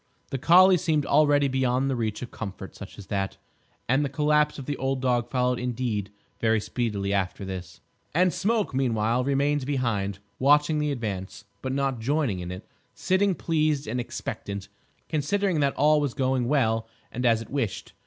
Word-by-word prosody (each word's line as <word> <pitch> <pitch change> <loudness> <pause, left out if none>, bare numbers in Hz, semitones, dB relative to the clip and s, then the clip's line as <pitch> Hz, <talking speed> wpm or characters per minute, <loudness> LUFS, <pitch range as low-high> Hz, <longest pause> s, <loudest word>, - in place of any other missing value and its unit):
The 135 - -2
collie 185 +5 +7
seemed 155 -4 0
already 145 -1 +4
beyond 130 0 +1
the 135 - 0
reach 110 -1 -2
of 120 - -8
comfort 95 -2 -7
such 105 - -10
as 100 - -9
that, 95 -1 -2 0.5
and 135 +4 +3
the 140 - -1
collapse 150 +2 +2
of 135 - -7
the 145 - -2
old 135 0 -1
dog 120 -2 0
followed 125 -1 +1
indeed 120 -5 -2 0.3
very 110 -1 +2
speedily 105 -2 -2
after 100 0 -1
this. 95 -2 -7 0.3
And 180 +1 +4
Smoke, 215 -4 0
meanwhile, 120 -2 +1
remained 140 +1 +1
behind, 115 -8 -1 0.2
watching 150 +3 +4
the 150 -1 0
advance, 100 -6 -5 0.2
but 130 - -3
not 135 -2 -1
joining 130 -5 0
in 90 0 -5
it; 90 - -8 0.3
sitting, 190 0 +2
pleased 155 -4 0
and 125 +3 -2
expectant, 105 -5 -5 0.4
considering 170 +4 0
that 140 -1 +1
all 150 +1 +4
was 140 -4 -2
going 130 -2 +1
well 115 -5 +1 0.2
and 125 - -4
as 115 -2 +4
it - - -17
wished. 135 -8 -3
130 Hz, 175 wpm, -26 LUFS, 110-145 Hz, 0.5 s, collie